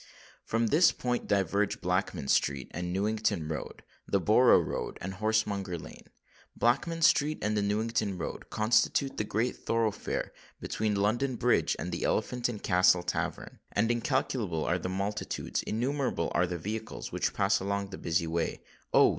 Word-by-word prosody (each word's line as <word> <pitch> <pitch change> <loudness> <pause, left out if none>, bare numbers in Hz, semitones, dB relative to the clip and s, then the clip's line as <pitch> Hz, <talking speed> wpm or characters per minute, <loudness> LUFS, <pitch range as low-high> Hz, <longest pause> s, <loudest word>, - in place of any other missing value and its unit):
From 115 +1 0
this 155 +9 +5
point 125 -1 -2
diverge 100 +1 +1
Blackman 65 - -1
Street, 70 -1 +1
the - - -4
Newington 100 -1 -1
Road, 80 0 -6 0.2
the - - +2
Borough - - +6
Road, - - -3
and 95 +2 -5
Horsemonger 100 -3 0
Lane. - - -12 0.5
Blackman 165 +8 +1
Street 155 0 +4
and 105 0 +1
the 105 - +2
Newington 105 -1 0
Road 85 - -6
constitute 120 +5 +2
the - - 0
great 110 +4 -1
thoroughfare 115 -2 -1 0.3
between 105 -1 -1
London 120 +6 +1
Bridge 120 +1 +2
and - - -4
the - - -3
Elephant 125 -1 0
and 110 -4 -6
Castle 90 -1 +4
tavern; 90 - -3
and 110 +3 +2
incalculable 120 - -1
are 90 +2 +1
the 90 - -4
multitudes—innumerable 105 - -2
are 90 +1 +2
the 90 0 -3
vehicles, 100 - -5
which - - -1
pass 100 0 +2
along 100 0 -2
the 95 - -7
busy 85 0 0
way,—oh! 80 +1 +1
105 Hz, 150 wpm, -30 LUFS, 90-115 Hz, 0.5 s, Borough